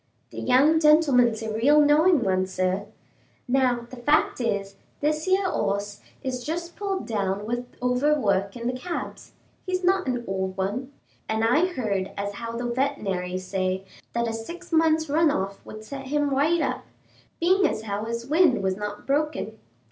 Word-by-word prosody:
"The - - -7
young 285 +6 +4
gentleman's 275 -8 +4
a 220 -1 -3
real 275 +7 +4
knowing 300 0 +5
one, 185 -1 +1
sir. 185 +2 -1 0.6
Now, 250 -1 +2
the 255 - -9
fact 290 +1 +2
is, 200 -4 -2 0.2
this 305 +3 0
'ere 380 +1 +3
hoss 200 - -2 0.2
is 255 -2 -3
just 340 +3 -4
pulled 395 -2 -3
down 200 -2 -2
with 240 +2 -3 0.2
over 265 +5 +2
work 200 -2 0
in 235 - -7
the 250 - 0
cabs; 335 +8 -6 0.3
he's 370 -1 -2
not 375 -2 +2
an 245 -2 -1
old 190 -1 -3
one, 215 +8 -2 0.4
and 220 0 0
I 295 +11 +4
heard 210 - -2
as 200 0 -3
how 230 +3 -6
the 240 +1 -3
vetenary 200 -8 -1
said 185 0 -2 0.3
that 235 0 0
a 225 - -2
six 340 +12 -8
months' 320 -1 +3
run 315 +2 +3
off 195 -8 -2
would 215 0 -9
set 270 +3 -7
him 290 0 0
right 305 +5 +2
up, - - -2 0.6
being 370 +3 +4
as 215 - -3
how 205 0 -3
his 235 +1 -4
wind 295 - +3
was 190 -1 +1
not 210 +1 -6
broken. 280 -7 -1
245 Hz, 170 wpm, -25 LUFS, 205-300 Hz, 0.6 s, knowing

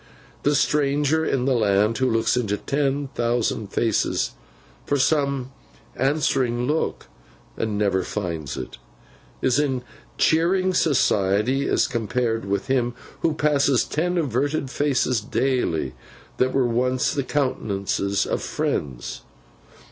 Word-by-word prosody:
The 145 +1 +2
stranger 150 +2 +2
in 135 -5 0
the 135 - +3
land 105 -1 +2
who 130 -1 +2
looks 115 0 +2
into 105 -5 0
ten 140 +1 -1
thousand 120 -3 -1
faces 110 +2 0 0.5
for 145 - 0
some 140 -2 +1 0.4
answering 130 -4 +1
look 150 +4 -1 0.5
and 110 -2 -2
never 100 -2 +2
finds 85 -9 -4
it, 65 - -7 0.6
is 130 +1 +3
in 130 -4 0 0.3
cheering 185 +4 +3
society 125 - +2
as - - +3
compared 115 -2 -1
with 100 0 -1
him 125 -3 0 0.3
who 160 -1 +1
passes 140 -4 +3
ten 175 +4 -1
averted 140 -1 0
faces 130 -5 +1
daily, 105 - 0 0.4
that 130 0 +2
were 135 -1 +2
once 125 +2 +1
the 140 - 0
countenances 100 -8 -1
of - - -2
friends. 65 -4 -3
130 Hz, 120 wpm, -23 LUFS, 110-145 Hz, 0.6 s, the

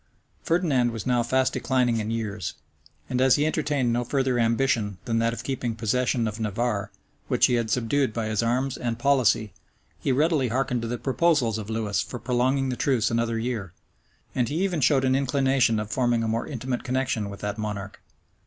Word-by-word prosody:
Ferdinand 155 -8 +2
was 115 -4 -5
now 125 -1 +2
fast 130 +2 +1
declining 125 -3 +1
in 110 0 -3
years, 105 -7 -3 0.5
and 125 - -1
as 130 -1 +5
he 145 - +1
entertained 145 -6 0
no 120 +1 0
further 130 -1 0
ambition 115 -3 +1
than 115 -1 0
that 115 0 +2
of 115 0 -6
keeping 125 -4 -2
possession 115 +1 0
of 105 +1 -5
Navarre, 110 -1 -1 0.4
which - - +4
he - - +1
had 115 -2 0
subdued 125 +3 +1
by 115 0 -3
his 110 0 0
arms 125 +3 0
and 120 -2 -2
policy, 120 -6 +2 0.5
he - - 0
readily 150 0 +2
hearkened 125 0 -1
to 115 - -3
the 120 +1 -2
proposals 135 -5 +1
of 105 0 -7
Lewis 110 -2 -1
for 125 - -6
prolonging 130 +3 +1
the 125 - -1
truce 125 -5 +1
another 115 0 0
year; 110 -6 -3 0.6
and 120 -2 0
he 165 +6 -1
even 180 -6 0
showed 135 0 +3
an 130 0 +3
inclination 135 -4 +2
of 105 0 -5
forming 120 -3 +1
a - - -1
more 115 +1 -1
intimate 125 -2 -3
connection 125 -5 -1
with 100 0 -9
that 105 +1 -3
monarch. 105 -2 -5
120 Hz, 190 wpm, -25 LUFS, 115-130 Hz, 0.6 s, as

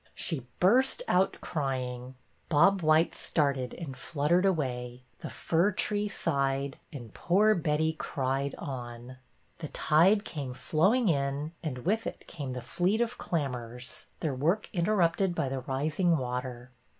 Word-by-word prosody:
She 135 -8 -3
burst 255 - +3
out 185 +1 +2
crying. 130 -4 -3 0.3
Bob 180 +5 +4
white 155 +1 +4
started 140 -5 0
and 145 -6 -7
fluttered 165 +7 +1
away, 125 -7 -2 0.2
the - - -6
fir 170 +5 +1
tree 205 +2 0
sighed, 140 -6 -1
and 120 -8 -9
poor 210 +5 +3
Betty 160 -2 +1
cried 135 -2 -2
on. 125 -3 -7 0.4
The 160 - -4
tide 185 +10 +3
came 135 -5 -5
flowing 205 - +2
in, 140 -1 0
and 130 -6 -5
with 220 +4 +1
it - - -7
came 140 -6 -6
the 125 -1 -6
fleet 180 - 0
of 235 0 -1
clammers, 125 -6 -4
their 155 -4 0
work 165 +11 0
interrupted 180 -1 +2
by 135 - 0
the 135 0 -2
rising 155 +7 +1
water. 125 -1 -4
150 Hz, 140 wpm, -29 LUFS, 130-175 Hz, 0.4 s, Bob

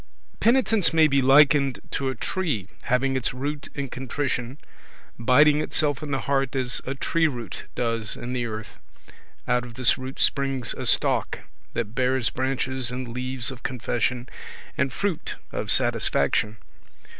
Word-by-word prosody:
Penitence 225 -7 +3
may 160 -1 +6
be 140 -2 +3
likened 140 0 +5
to 135 -1 -1
a 130 - -3
tree, 135 - -2 0.2
having 135 +2 +1
its 130 0 -1
root 145 +3 -4
in 140 -1 -3
contrition, 130 0 -3 0.6
biding 145 +5 +5
itself 150 -2 -1
in 150 - -6
the 135 -1 -1
heart 135 -1 0
as 130 -2 +2
a 135 - -2
tree 160 +4 +1
root 120 - -6
does 115 -2 -1
in 125 +1 -6
the 120 -2 -1
earth; 110 -1 -8 0.7
out 125 0 +2
of 120 -1 -10
this 130 0 +3
root 130 +1 -7
springs 135 -3 +1
a - - -5
stalk, - - +1 0.3
that 110 -2 -2
bears 130 -1 +1
branches 130 -1 -1
and 125 0 -5
leaves 130 0 -3
of 125 -2 -10
confession, 125 0 -2 0.5
and 135 -1 0
fruit 195 +4 -3 0.2
of - - -4
satisfaction. 105 +1 +3
130 Hz, 150 wpm, -25 LUFS, 125-140 Hz, 0.7 s, may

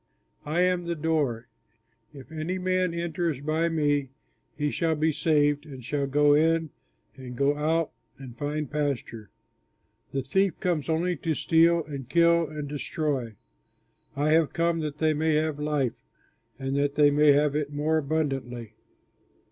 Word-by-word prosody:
"I 160 +4 +1
am 180 -1 +1
the 170 0 -2
Door; 150 -7 -1 0.6
if 140 0 -13
any 160 +4 -3
man 185 -1 0
enters 170 -3 -2
by 155 +3 0
me 145 -4 0 0.5
he 150 -1 0
shall 165 -1 0
be 155 +1 +1
saved 145 -1 +2
and 130 -4 -10
shall 140 +1 -1
go 145 +1 +4
in 160 0 +2 0.4
and 130 -2 -9
go 140 +3 +2
out 160 +2 0 0.3
and 130 -3 -10
find 150 +3 -3
pasture. 140 -7 -3 0.8
The 135 -1 -2
thief 190 +6 +1
comes 165 -6 -1
only 170 +2 0
to 160 +1 -2
steal 165 +2 +3
and 140 -4 -7
kill 170 -1 +4
and 150 -2 -5
destroy. 140 -5 -3 0.8
I 145 +2 +1
have 160 -1 +3
come 170 0 +1
that 150 -2 -4
they 155 0 +2
may 155 +1 +1
have 155 -1 0
life, 150 -5 0 0.6
and 135 0 -3
that 145 0 0
they 145 0 +5
may 145 0 +5
have 145 0 +2
it 150 -1 -1
more 155 +2 +1
abundantly. 135 -7 -3
150 Hz, 155 wpm, -26 LUFS, 140-160 Hz, 0.8 s, they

